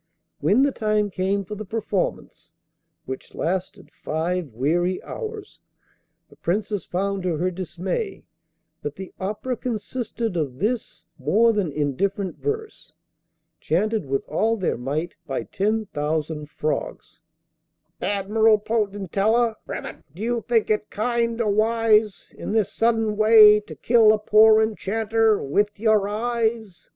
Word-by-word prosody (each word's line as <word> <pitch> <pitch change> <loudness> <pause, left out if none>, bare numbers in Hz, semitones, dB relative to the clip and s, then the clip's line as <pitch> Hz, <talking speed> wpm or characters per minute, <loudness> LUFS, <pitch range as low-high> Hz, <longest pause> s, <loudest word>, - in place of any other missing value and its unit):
When 200 - +3
the 285 - +3
time 215 -3 0
came 195 +2 -1
for 210 - -7
the 210 +1 -5
performance 210 -2 -3 0.5
(which 130 - -7
lasted 190 +3 -3
five 170 +2 -2
weary 170 +10 0
hours) 440 -3 -7 0.7
the - - -20
Princess 205 +1 -2
found 195 +2 -2
to 180 -3 -1
her 180 +3 0
dismay 185 - -4 0.6
that 145 0 -5
the 190 -1 -9
'opera' 210 +6 -3
consisted 230 -2 -3
of 145 -6 -2
this 220 - -2 0.2
more 215 - +3
than 200 -7 -1
indifferent 180 +7 -2
verse, 435 0 -4 0.7
chanted 210 +1 0
with 135 +1 -2
all 220 +9 +1
their 185 - 0
might 145 +8 -3
by 135 -2 -2
ten 215 +3 -1
thousand 150 -2 -3
frogs: 155 +1 -4 0.8
'Admirable 210 +3 +3
Potentilla, 210 +1 0 0.6
Do 190 - -9
you 235 0 0
think 225 -3 +2
it 210 0 0
kind 235 +1 -1
or 215 -3 +1
wise 220 -1 +2
In - - -5
this 215 -2 +1
sudden 225 -2 +1
way 215 -1 +8
to 210 - -11
kill 230 -2 +5
a - - +2
Poor 215 +1 +6
Enchanter 220 0 +1
with 205 +9 0
your 215 -2 +3
eyes? 220 -2 -2
210 Hz, 130 wpm, -23 LUFS, 180-225 Hz, 0.8 s, way